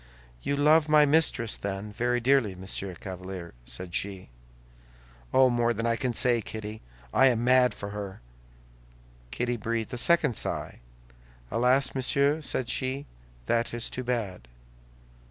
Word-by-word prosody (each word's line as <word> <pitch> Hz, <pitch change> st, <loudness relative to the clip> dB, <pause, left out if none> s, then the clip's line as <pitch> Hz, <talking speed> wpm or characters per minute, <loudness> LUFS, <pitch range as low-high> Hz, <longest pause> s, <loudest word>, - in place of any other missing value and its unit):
"You 140 Hz, -, -1 dB
love 150 Hz, +2 st, +4 dB
my 150 Hz, -1 st, +6 dB
mistress, 140 Hz, -7 st, +3 dB
then, 100 Hz, +1 st, -5 dB
very 120 Hz, +2 st, 0 dB
dearly, 120 Hz, -5 st, +2 dB
Monsieur 95 Hz, 0 st, -4 dB
Chevalier?" 90 Hz, -2 st, -7 dB
said 90 Hz, +4 st, -4 dB
she. 95 Hz, -3 st, -3 dB, 1.0 s
"Oh, 130 Hz, -1 st, +5 dB
more 120 Hz, -1 st, +1 dB
than 115 Hz, +2 st, -2 dB
I 115 Hz, 0 st, +2 dB
can 125 Hz, +1 st, -1 dB
say, 120 Hz, -3 st, +3 dB
Kitty! 110 Hz, 0 st, -7 dB, 0.3 s
I 135 Hz, -, +6 dB
am 120 Hz, -2 st, +1 dB
mad 125 Hz, 0 st, +4 dB
for 100 Hz, 0 st, -6 dB
her!" 100 Hz, -2 st, -6 dB, 1.1 s
Kitty 120 Hz, -, -2 dB
breathed 115 Hz, +2 st, -3 dB
a 125 Hz, -, -1 dB
second 150 Hz, -1 st, +4 dB
sigh. -, -, -2 dB, 0.7 s
"Alas, 125 Hz, +4 st, +2 dB
monsieur," 140 Hz, +3 st, +1 dB
said 130 Hz, -3 st, -1 dB
she, 130 Hz, +3 st, -2 dB, 0.4 s
"that 115 Hz, -, 0 dB
is 120 Hz, -, -2 dB
too 130 Hz, -, -4 dB
bad." 110 Hz, -, -3 dB
120 Hz, 140 wpm, -27 LUFS, 100-130 Hz, 1.1 s, my